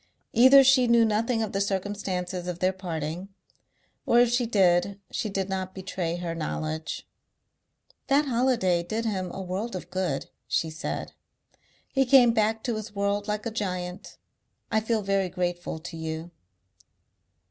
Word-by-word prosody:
Either 260 +4 +8
she 260 -2 +5
knew 235 -1 +5
nothing 225 +2 +1
of 215 - -3
the 195 - -1
circumstances 190 -2 -2
of 180 -2 -3
their 185 +1 +1
parting 175 0 -5 0.8
or 235 - +5
if 240 -1 +4
she 240 -1 +1
did 195 -2 +3
she 215 - -2
did 195 -1 -2
not 190 -1 -4
betray 185 -3 -3
her 175 -1 -4
knowledge. 155 0 -4 1.0
"That 285 +2 +3
holiday 235 -9 +2
did 215 +7 -3
him 190 -4 -2
a 195 - -5
world 190 +5 -3
of 180 0 -7
good," 180 -7 -2 0.2
she 160 +8 0
said. 160 +1 -5 0.7
"He 270 -2 +1
came 245 -3 +7
back 220 0 +1
to 235 -3 -1
his 215 0 -7
work 200 +1 0
like 210 +1 -2
a 230 - -2
giant. 185 -3 -4 0.5
I 220 - +3
feel 220 0 -1
very 195 -1 +1
grateful 175 -1 -3
to 165 +1 -8
you." 160 +1 -5
195 Hz, 155 wpm, -27 LUFS, 180-225 Hz, 1.0 s, Either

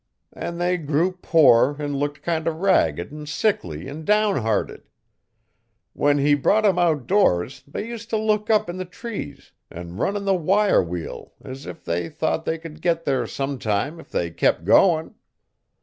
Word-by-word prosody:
An 170 - -5
they 180 +1 +1
grew 160 +3 0
poor 150 -7 +4
an' 145 -1 -3
looked 145 +1 -3
kind 165 -1 -1
o' - - +3
ragged 150 - +1
an' 150 0 -8
sickly 90 - -1
an' 150 +3 -7
downhearted. 195 - 0 1.1
When 145 0 +2
he 145 +1 +3
brought 205 +10 +2
'em 190 -3 +3
outdoors 155 - +1
they 145 - -5
used 230 -1 -8
t' 220 - 0
look 215 0 0
up 215 -4 +3
in 175 +1 -5
the 185 - -4
trees 180 -7 -8 0.2
an' 85 +1 -9
run 195 - 0
in 200 - -5
the 195 - +3
wire 195 +4 +3
wheel 85 -1 -6
as 130 +2 -9
if 165 - -9
they 85 0 -2
thought 160 0 -2
they 160 - -1
could 160 -1 -11
get 165 -1 0
there 135 -2 0
sometime 135 +1 -2
if - - -14
they 85 -1 -2
kep' 80 - +1
goin'. 160 - +4
155 Hz, 170 wpm, -23 LUFS, 135-185 Hz, 1.1 s, poor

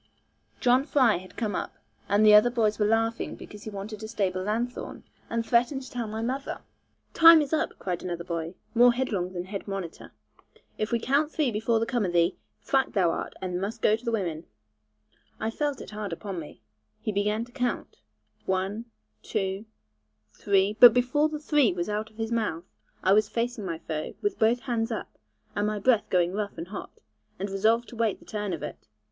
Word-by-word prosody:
John 250 +2 +4
Fry 260 - +3
had 185 +1 -12
come 215 -3 -1
up, - - -4 0.3
and 205 +2 +4
the 210 +2 +8
boys 220 -3 +1
were 210 - +3
laughing 225 +1 0
because 210 - -11
he - - -4
wanted 205 +1 -7
a 220 - -5
stable 190 -4 -1
lanthorn, 230 +5 -3 0.3
and 230 0 -1
threatened 245 +4 +2
to 255 - -11
tell 240 -2 -3
my 220 +1 -4
mother. 265 +4 -3 0.5
'Time 330 0 +9
is 295 0 -1
up,' 315 - 0
cried 180 -2 -3
another 175 -2 -4
boy, 170 0 -4 0.2
more 245 +1 +6
headlong 205 -8 -1
than 175 -1 -4
head 195 +2 -6
monitor. 195 -4 -6 0.7
'If 215 +2 -1
we 235 - +3
count 280 +6 +1
three 300 -6 +1
before 220 +2 +1
the 225 - 0
come 235 -1 0
of 180 -3 -1
thee, 170 +1 +3 0.3
thwacked 270 -1 +1
thou 180 -5 +3
art, - - -4
and 180 -1 -2
must 215 +3 -4
go 215 - +5
to 225 - -11
the 235 - -1
women.' 170 -7 -2 0.9
I 220 - -1
felt 290 +3 -2
it - - -9
hard 210 -2 -5
upon 190 +1 -5
me. 150 -8 -11 0.4
He 215 - -2
began 210 +3 0
to 245 - -19
count, 250 -2 -3 0.5
one, 190 +4 -1 0.4
too, 195 +2 -2 0.7
three 200 - +2
but 240 -1 +10
before 255 +5 +2
the 305 - -4
'three' 295 - +2
was 175 +2 -3
out 210 +1 -2
of 215 - -24
his 225 0 -3
mouth, 210 -8 -1 0.4
I 190 - +5
was 210 0 +3
facing 235 -2 -2
my 165 -2 -3
foe, 155 -1 -5
with 410 -1 -1
both 230 +2 +3
hands 235 -3 -1
up, 220 - -6 0.4
and 205 +1 +1
my 210 0 -1
breath 225 +1 +2
going 180 -1 +2
rough 205 -2 -3
and 165 +2 -6
hot, 200 - -8 0.4
and 195 +1 -4
resolved 220 +4 +2
to - - -10
wait 225 -3 0
the - - -19
turn 210 -2 -3
of 165 -5 -4
it. - - -8
215 Hz, 200 wpm, -27 LUFS, 195-240 Hz, 0.9 s, but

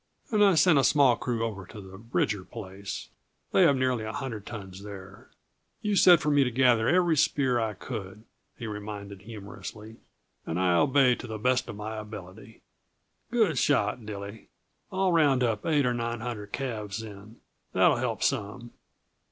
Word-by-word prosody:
"And 210 -2 +4
I 195 -3 +5
sent 160 -2 +5
a - - +3
small 135 -4 +5
crew 115 -2 -2
over 100 -5 -6
to 110 - -10
the 95 -1 -11
Bridger 110 -3 -1
place; 95 +2 -8 0.4
they - - +4
have 155 -6 +6
nearly 130 -3 0
a 110 - -4
hundred 110 -5 -5
tons 95 -4 -8
there. 95 -1 -11 0.5
You 210 -1 +1
said 180 -3 +7
for 150 - +1
me 145 -1 +5
to 125 - 0
gather 120 -2 +3
every 175 -2 +3
spear 135 -4 +2
I 110 -2 -2
could," 105 -1 -7 0.3
he 115 - -7
reminded 105 -2 -7
humorously, 110 +1 -9 0.5
"and 80 - -3
I 90 -1 +3
obeyed 135 +3 +4
to - - -7
the 110 -1 -5
best 125 +3 +1
of 115 - -6
my 110 +1 -6
ability." 105 0 -10 0.7
"Good 215 - +2
shot, 115 -4 +1
Dilly. 100 0 -8 0.4
I'll 190 -1 +1
round 145 -6 +3
up 110 -3 -1
eight 150 -4 +3
or 125 - +1
nine 120 -1 -3
hundred 110 -4 -6
calves, 110 -6 -4
then; 105 +1 -11 0.4
that'll - - +4
help - - -2
some. 115 +4 -2
115 Hz, 170 wpm, -28 LUFS, 105-135 Hz, 0.7 s, said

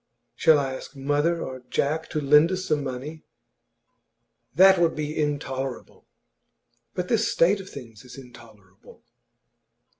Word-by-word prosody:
'Shall 160 -2 +4
I 135 -2 -2
ask 130 - -9
mother 145 +5 0
or 130 -1 -7
Jack 155 +3 -1
to 155 - -2
lend 150 +4 +4
us 185 0 -3
some 150 -5 0
money?' 140 +4 -6 1.3
'That 190 +1 +6
would 170 -1 +2
be 150 0 -4
intolerable.' 135 -3 -4 0.9
'But 180 0 -3
this 230 - +1
state 195 +4 +2
of 190 - -12
things 115 -6 -11
is 125 0 -13
intolerable! 110 -7 -16
145 Hz, 130 wpm, -24 LUFS, 130-165 Hz, 1.3 s, That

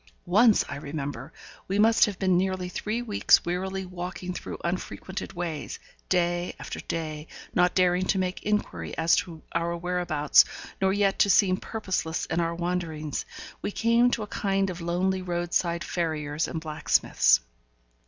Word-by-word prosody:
Once 210 +5 +5
I 145 - -5
remember 140 -2 -5 0.4
we 195 - -1
must 225 +2 +5
have 205 -4 -4
been 185 -2 +2
nearly 185 0 0
three 215 +6 -3
weeks 210 -4 +4
wearily 190 +2 -2
walking 180 0 -5
through - - -6
unfrequented 180 +2 -4
ways, 170 -4 -4 0.3
day 175 -1 +1
after - - -6
day, 155 -2 -4 0.3
not 180 -1 +3
daring 180 0 +3
to 195 - +1
make 185 0 -2
inquiry 90 - -2
as 165 +1 +4
to 165 -3 -4
our 170 0 -1
whereabouts, 175 -4 +3 0.4
nor 190 0 +3
yet 195 0 +1
to 200 - +5
seem 185 -2 +4
purposeless 185 -8 -3
in 165 - -1
our 170 0 0
wanderings 170 -4 -3 0.4
we - - -2
came 230 +3 +3
to 230 -3 -1
a - - -7
kind 195 -1 +1
of 175 -1 -8
lonely 185 +3 0
roadside 175 -1 -1
farrier's 155 -2 -2
and 160 - -4
blacksmith's. 155 -1 +3
180 Hz, 155 wpm, -27 LUFS, 165-190 Hz, 0.4 s, Once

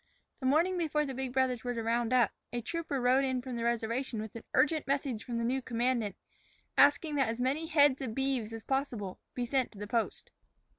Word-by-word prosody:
The 260 - -1
morning 340 +6 +3
before 305 -2 +1
the 270 - -4
big 260 0 -3
brothers 255 -2 +1
were 245 -1 -2
to 230 - -2
round 235 +1 0
up, 245 -5 +4 0.2
a 240 - -2
trooper 305 +2 -3
rode 255 +2 +4
in 260 -1 0
from 250 0 -5
the 235 - -3
reservation 235 +1 -1
with 220 0 -6
an 230 - -7
urgent 305 -1 +3
message 270 -5 -1
from 240 -1 -4
the 230 - -1
new 260 +3 0
commandant, 235 -4 0 0.6
asking 290 +2 +5
that 265 -5 +2
as 230 +1 -3
many 280 +6 0
head 290 -4 +4
of 230 -5 -4
beeves 265 -5 0
as 225 -1 -7
possible 245 -8 -2 0.2
be 245 - -1
sent 260 0 0
to - - -14
the 205 - -5
post. 225 +1 -2
255 Hz, 215 wpm, -31 LUFS, 230-275 Hz, 0.6 s, asking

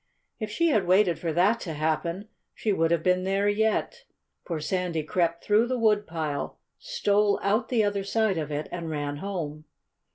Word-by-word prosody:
If 215 -2 -3
she 335 +11 +1
had 215 - +2
waited 185 -2 +4
for 165 - -2
that 190 +8 +3
to 165 - -5
happen 170 +6 -1 0.3
she 215 - 0
would 165 -3 +2
have 170 -1 +1
been 180 0 +2
there 195 +2 +1
yet. 220 - 0 0.4
For 165 -3 -3
Sandy 175 0 -1
crept 170 +1 0
through 215 +3 +3
the 255 +1 -1
woodpile, 170 -10 0 0.2
stole 210 - +1
out 210 +5 +1
the 235 -4 +2
other 205 -1 0
side 200 -2 +1
of 155 -2 -4
it, 150 +1 -3
and 170 -2 -4
ran 145 -2 -3
home. 155 -4 -5
185 Hz, 175 wpm, -27 LUFS, 165-210 Hz, 0.4 s, waited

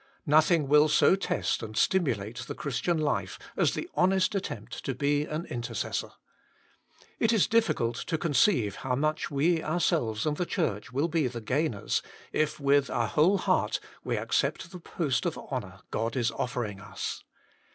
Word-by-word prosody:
Nothing 155 0 +4
will 150 +2 +6
so 180 - +5
test 195 - -1
and 110 -2 -7
stimulate 120 - +1
the - - -5
Christian 145 +5 -1
life 150 -2 -1 0.2
as - - +2
the 325 - -4
honest 190 +1 +2
attempt 115 - -5
to 135 - -2
be 145 +2 +1
an 155 +2 -4
intercessor. 120 -2 -3 1.1
It 225 - +3
is 220 -5 +4
difficult 170 - +1
to 165 - 0
conceive 145 - +2
how 125 -1 -1
much 155 +3 0
we 160 +4 +2
ourselves 155 - 0
and 150 -1 0
the 180 - 0
Church 125 - -2
will 140 +6 +1
be 160 -4 +1
the 120 -1 -5
gainers, 125 -1 -1 0.3
if 155 0 0
with 140 -1 +3
our - - 0
whole 175 +7 +4
heart - - +1 0.2
we - - -1
accept 170 - -1
the 180 - -8
post 155 -5 -1
of - - -3
honour - - -6
God 115 +1 -1
is 120 -3 +1
offering 115 -4 -3
us. 105 - -5
145 Hz, 160 wpm, -28 LUFS, 120-170 Hz, 1.1 s, will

